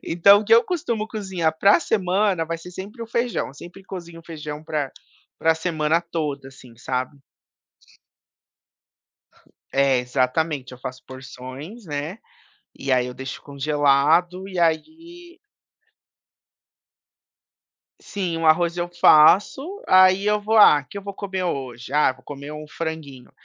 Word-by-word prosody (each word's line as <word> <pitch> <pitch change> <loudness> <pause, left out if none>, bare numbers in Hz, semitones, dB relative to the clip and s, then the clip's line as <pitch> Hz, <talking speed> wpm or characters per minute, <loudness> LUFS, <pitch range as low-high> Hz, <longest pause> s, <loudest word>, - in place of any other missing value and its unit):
Então, 200 +5 +5
o - - -6
que 225 +2 +5
eu 230 - +6
costumo 235 -12 -2
cozinhar 190 -7 -2
pra 200 - +5
semana 190 - 0
vai 165 +1 -4
ser 180 +2 -11
sempre 205 +6 -8
o - - -6
feijão, 235 +1 -2
eu - - -14
sempre 175 +6 -12
cozinho 170 -3 -9
feijão 150 -2 -7
para 155 -3 -2
a - - -17 0.5
para 165 0 +3
a - - -5
semana 160 -1 0
toda, 150 -5 -4
assim, 125 -3 -16
sabe. 130 +3 -4 2.6
É, 135 -2 +3
exatamente, 130 +2 -1
eu 125 - -11
faço 130 0 -8
porções, 130 - -10
né, 150 +7 -5 0.6
e 135 - -5
aí 125 -1 +2
eu 125 - -7
deixo 130 0 -7
congelado. 150 +6 +1
E 185 - -6
aí 330 - -2 2.6
Sim, 180 -5 -4
o 165 - -1
arroz 170 +2 +3
eu 175 0 -2
faço, 205 - +4
aí 185 +2 +5
eu 210 0 +2
vou: 220 +2 0
"Ah, 150 -9 +7
que 175 - -14
eu 200 - -5
vou 200 0 -6
comer 190 -1 -4
hoje? 130 -6 -5
Ah, 150 -3 +3
vou 130 - -22
comer 140 +1 -9
um 150 0 -8
franguinho." 155 -7 -7
165 Hz, 145 wpm, -22 LUFS, 140-195 Hz, 2.6 s, Ah